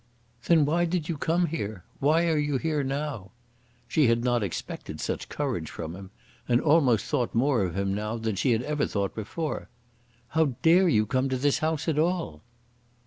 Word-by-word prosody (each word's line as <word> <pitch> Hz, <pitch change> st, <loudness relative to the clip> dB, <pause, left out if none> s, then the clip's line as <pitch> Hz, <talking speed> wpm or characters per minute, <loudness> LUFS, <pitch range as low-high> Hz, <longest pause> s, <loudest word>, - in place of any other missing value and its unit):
"Then 160 Hz, -4 st, +5 dB
why 170 Hz, +4 st, +2 dB
did 170 Hz, -2 st, -2 dB
you 165 Hz, -, 0 dB
come 170 Hz, +4 st, +1 dB
here? 110 Hz, -, -4 dB, 0.2 s
Why 155 Hz, +4 st, +3 dB
are 160 Hz, -2 st, +2 dB
you 145 Hz, -2 st, 0 dB
here 150 Hz, 0 st, -1 dB
now?" 135 Hz, -7 st, -3 dB, 0.6 s
She 145 Hz, +3 st, +3 dB
had 115 Hz, 0 st, +2 dB
not 120 Hz, -1 st, +2 dB
expected 100 Hz, -5 st, -5 dB
such -, -, -3 dB
courage 130 Hz, -, -3 dB
from 80 Hz, +1 st, -6 dB
him, 95 Hz, 0 st, -10 dB, 0.4 s
and 120 Hz, 0 st, +4 dB
almost 135 Hz, -8 st, +3 dB
thought 125 Hz, -3 st, -1 dB
more 125 Hz, -1 st, +3 dB
of 90 Hz, -1 st, -2 dB
him 100 Hz, 0 st, 0 dB
now 105 Hz, +3 st, -3 dB
than 110 Hz, -2 st, -2 dB
she 125 Hz, +7 st, +1 dB
had 115 Hz, +1 st, +1 dB
ever 150 Hz, +1 st, -1 dB
thought 100 Hz, -2 st, -2 dB
before. 150 Hz, +9 st, -4 dB, 0.6 s
"How 155 Hz, -5 st, +1 dB
dare 175 Hz, +3 st, +6 dB
you 110 Hz, -8 st, +3 dB
come 130 Hz, +3 st, 0 dB
to 130 Hz, -, 0 dB
this 140 Hz, +2 st, +1 dB
house 155 Hz, 0 st, -1 dB
at 155 Hz, -2 st, +1 dB
all?" 165 Hz, -, -1 dB
135 Hz, 190 wpm, -27 LUFS, 110-155 Hz, 0.6 s, dare